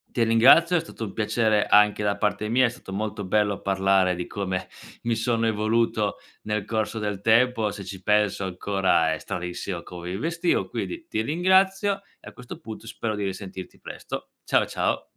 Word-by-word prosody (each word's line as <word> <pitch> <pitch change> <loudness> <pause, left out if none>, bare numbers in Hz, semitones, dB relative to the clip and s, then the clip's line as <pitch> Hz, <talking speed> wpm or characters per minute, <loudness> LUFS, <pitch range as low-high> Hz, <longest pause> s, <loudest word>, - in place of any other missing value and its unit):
Ti 120 -3 +3
ringrazio. 140 +10 +6
È - - +3
stato 160 -7 -8
un 100 - -8
piacere 110 -1 +1
anche 105 0 +4
da 100 -1 0
parte 105 0 -1
mia. 130 +3 +4
È - - +2
stato 120 -5 -11
molto 105 0 -3
bello 100 +1 +1
parlare 95 -1 +2
di 90 0 -4
come 95 -2 -3 0.4
mi 115 0 0
sono 115 0 0
evoluto 110 0 +1 0.3
nel 105 -1 -2
corso 110 0 -2
del 105 -2 -3
tempo, 115 0 +3
se 100 - -7
ci 95 0 -8
penso 105 0 +2
ancora 95 -3 +1
è 80 - -4
stranissimo 90 0 -5
come 90 0 -8
mi 95 - -3
vestivo, 165 - 0
quindi 340 -1 -5
ti - - -1
ringrazio, 190 - +2 0.2
e - - -15
a - - -18
questo 125 -1 -10
punto 110 0 -9
spero 115 -2 -3
di 105 - -3
risentirti 95 -1 -6
presto. - - -7
Ciao, - - +2
ciao - - -1
105 Hz, 180 wpm, -25 LUFS, 95-115 Hz, 0.4 s, ringrazio